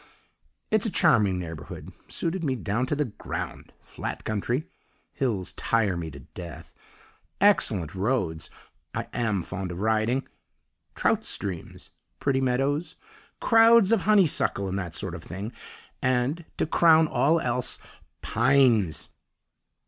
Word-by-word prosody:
"It's 215 +1 +3
a - - 0
charming 105 - +3
neighbourhood 80 -3 -7
suited 170 +1 -2
me 135 -4 0
down 110 +4 -1
to 145 - 0
the 150 0 0
ground: 110 - -6
flat - - -6
country 120 - -2 0.5
(hills 110 -9 -1
tire 110 -5 +1
me 85 -2 -4
to 70 -2 -11
death), 85 +2 -10 0.7
excellent 110 - +3
roads 95 -6 -1 0.5
(I - - -3
am 110 -6 0
fond 95 0 -5
of 90 - -6
riding), 110 +5 +1 0.7
trout - - +1
streams, 90 -5 -5 0.3
pretty 135 -1 +1
meadows, 140 +6 0 0.4
crowds 225 -2 +6
of 225 -4 +4
honeysuckle 180 - +3
and 95 +1 -2
that 85 -4 -5
sort 95 -5 -3
of 85 - -7
thing, 100 +7 -6 0.5
and, 130 +6 0
to - - +1
crown 160 0 +5
all 150 +5 +2
else, 125 -3 0 0.5
Pines!!! 120 - +3
120 Hz, 125 wpm, -26 LUFS, 95-150 Hz, 0.7 s, crowds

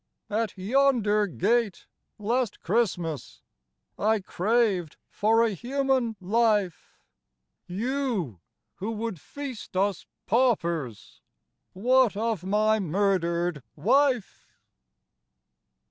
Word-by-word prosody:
IS - - -2
At 220 -3 -1
yonder 215 -1 +2
gate, 210 +3 0 0.3
last 230 +1 -1
Christmas, 175 - -1 0.6
I 220 +1 +2
craved 195 -3 0
for 225 +2 +3
a 230 - +2
human 260 +1 0
life. 205 -2 0 0.7
You, 215 - -2 0.4
who 205 - -4
would 220 -7 -4
feast 270 -9 -7
us 195 -1 0 0.2
paupers. 170 - 0 0.5
What 245 +2 +3
of 220 -4 -1
my 215 +3 +2
murdered 175 -3 0
wife! 260 - +1
210 Hz, 85 wpm, -27 LUFS, 185-235 Hz, 0.7 s, for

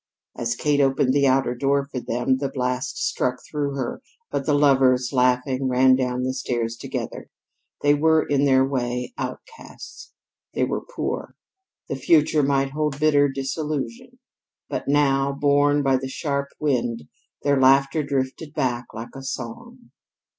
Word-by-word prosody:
As 120 0 -2
Kate 145 +2 +1
opened 135 -1 +2
the 140 0 +3
outer 130 -1 +2
door 140 +2 +1
for 135 -2 -5
them, 125 +2 0
the 140 -1 -2
blast 125 -1 -2
struck 130 0 -1
through 145 -2 -3
her, 130 -3 -4 0.3
but - - -3
the 145 - +3
lovers, 135 -3 +3
laughing, 130 +1 +1
ran 130 +1 +5
down 125 -1 -1
the 130 0 -1
stairs 120 -3 -2
together. - - -6 0.5
They 145 0 +5
were, 160 +1 +3
in 145 0 +2
their 130 -1 +4
way, 125 - -3
outcasts; 460 -2 -8 0.4
they - - +1
were - - -1
poor; - - -5 0.5
the - - -3
future 150 +2 +3
might 135 -1 +1
hold 150 -1 -2
bitter 145 -2 +4
disillusion. 135 -2 -4 0.5
But - - -4
now, 140 -1 +2
borne 145 +1 +2
by 135 -1 +3
the 130 0 -5
sharp 140 0 -2
wind, 120 - -1 0.4
their 140 -2 +2
laughter 135 +3 +4
drifted 140 +2 -3
back 120 -2 -1
like 115 +3 -8
a 135 - -7
song. 135 - -7
135 Hz, 150 wpm, -23 LUFS, 130-145 Hz, 0.5 s, ran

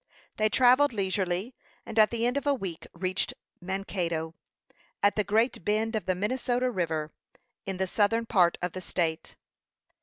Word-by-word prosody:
They 215 0 +2
travelled 255 +4 +5
leisurely, 190 +2 -1 0.3
and 225 - -2
at 215 - +7
the 235 0 -1
end 245 +2 +1
of 280 0 -2
a 285 - +4
week 175 -8 -6
reached 185 +2 -2 0.3
Mankato, 175 -4 -3 0.7
at 205 - +4
the 210 - +2
great 220 0 +1
bend 220 +3 0
of 215 - -3
the 185 - +2
Minnesota 250 +5 0
River, 160 -6 -2 0.6
in 190 -1 -3
the 190 - 0
southern 220 +4 +1
part 180 -6 +3
of 180 - -1
the 185 - -6
state. 165 -3 -2
200 Hz, 160 wpm, -28 LUFS, 180-230 Hz, 0.7 s, at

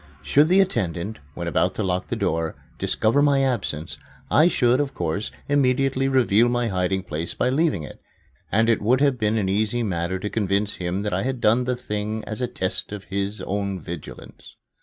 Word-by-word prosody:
Should 145 - +4
the 185 +3 +5
attendant, 100 - -2 0.2
when 85 -1 -4
about 90 +2 +1
to 110 - -1
lock 90 -1 -1
the - - -2
door, 80 -1 -1 0.2
discover 115 +6 +2
my 140 -2 +3
absence, 100 - -2 0.3
I 155 +3 +6
should, 125 -6 +3
of 140 -2 -2
course, 85 +7 -2 0.2
immediately 135 -1 +2
reveal 120 -3 +4
my 120 -1 0
hiding 95 0 0
place 80 -1 -4
by 125 - +1
leaving 150 - +1
it; 75 - -10 0.5
and 110 +2 +3
it 115 -2 +2
would 120 +5 +3
have 140 -4 +2
been 110 0 +1
an 100 -3 0
easy 110 +4 +1
matter 90 -2 -1
to 95 +3 -4
convince 100 -1 0
him 90 +2 -2
that 105 - -2
I 95 - 0
had 130 +1 -2
done 115 +3 +3
the 125 0 0
thing 105 -2 -4
as 110 +1 -4
a 125 - +1
test 95 -3 -3
of 105 -1 -6
his 100 +1 -2
own 100 -1 -2
vigilance. 85 -1 -10
105 Hz, 195 wpm, -23 LUFS, 95-125 Hz, 0.5 s, I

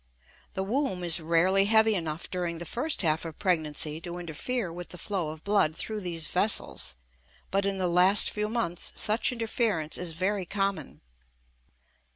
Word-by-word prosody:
The 190 - -1
womb 210 -4 -1
is 170 -1 +4
rarely 170 +4 +3
heavy 220 +1 +4
enough 165 -4 -3
during 175 -2 -3
the 170 - -7
first 255 - -1
half 155 -1 +2
of 165 -2 -7
pregnancy 155 -3 0
to 175 0 -6
interfere 175 +4 -3
with 175 0 -8
the 180 - -8
flow 180 -3 -2
of 155 0 -9
blood 200 -7 +2
through 215 +4 -3
these 170 -4 -2
vessels, 180 - +1 0.6
but 195 +1 +1
in 195 -1 -1
the 185 -1 0
last 180 +4 +5
few 210 0 -2
months 215 -7 -2
such 215 +4 +1
interference 225 -9 -1
is 175 -2 -3
very 185 +2 -1
common. 195 - -3
180 Hz, 165 wpm, -28 LUFS, 165-205 Hz, 0.6 s, last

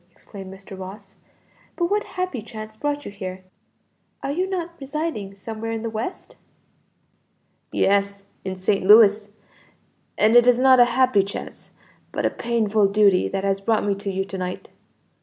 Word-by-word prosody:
exclaimed 190 +1 -11
Mr. 195 0 -11
Ross; 195 +1 -10 0.6
"but 345 - 0
what 415 +4 0
happy 365 -10 -4
chance 215 0 -9
brought 290 +4 -3
you - - -6
here? 185 -2 -7 0.8
Are 275 - -2
you 365 +6 -1
not 350 -3 -3
residing 275 -8 -4
somewhere 220 +2 -6
in 225 0 -4
the 230 - -3
West?" 225 - -6 1.3
"Yes; 200 0 +1 0.2
in 190 -1 -4
St. 185 +1 0
Louis; 210 0 +6 0.9
and 220 +2 +4
it 240 0 +7
is 250 -1 +6
not 260 0 +6
a 245 - +8
happy 255 -6 +4
chance, 195 +1 -7 0.4
but - - -2
a - - +2
painful 220 -3 +1
duty 200 -2 +3
that 195 0 -3
has 195 0 0
brought 220 +1 +1
me 205 - +2
to 200 +1 -5
you 190 0 -1
to 190 -1 -6
night." 180 0 -5
210 Hz, 160 wpm, -23 LUFS, 195-245 Hz, 1.3 s, a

